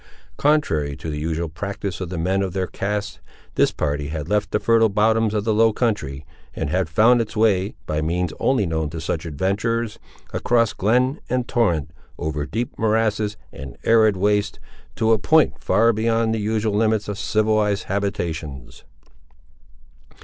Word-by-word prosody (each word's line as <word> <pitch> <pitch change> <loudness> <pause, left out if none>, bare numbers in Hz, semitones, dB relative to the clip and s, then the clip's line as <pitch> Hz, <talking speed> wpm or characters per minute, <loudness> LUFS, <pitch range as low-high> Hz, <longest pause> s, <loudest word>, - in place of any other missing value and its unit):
Contrary 80 - +1
to 80 - -6
the 75 - -4
usual 80 +2 -2
practice 100 +3 -5
of 90 - -4
the 90 - -5
men 95 +4 0
of 95 -3 -2
their 95 -1 -1
caste, 105 +2 -4 0.3
this - - +3
party 75 -1 -2
had 75 -1 -5
left 105 +2 0
the 105 - 0
fertile 115 -1 +3
bottoms 110 +2 +2
of 105 - 0
the 110 0 +1
low 110 +1 +4
country, 100 - -2 0.3
and 70 - -3
had 90 -2 0
found 115 +8 +4
its 110 -1 -5
way, 105 -2 +2
by 75 0 -1
means 85 +2 -1
only 130 -6 +2
known 80 -2 -1
to 80 +1 -6
such 80 +1 -3
adventurers, 105 - -1 0.3
across 115 -2 +2
glen 125 - +1
and 125 -1 -1
torrent, 85 - +1 0.3
over 75 -1 -3
deep 115 +8 -4
morasses 110 -1 +1 0.2
and 65 -3 -9
arid 110 -3 +4
wastes, 105 +1 +1 0.4
to 110 0 +2
a 110 - +4
point 155 +7 +3
far 115 +1 +3
beyond 115 +1 +1
the 115 - -1
usual 110 0 0
limits 110 0 +1
of 105 0 -4
civilised 105 -1 +1
habitations. 85 -9 -4
105 Hz, 165 wpm, -22 LUFS, 85-110 Hz, 0.4 s, low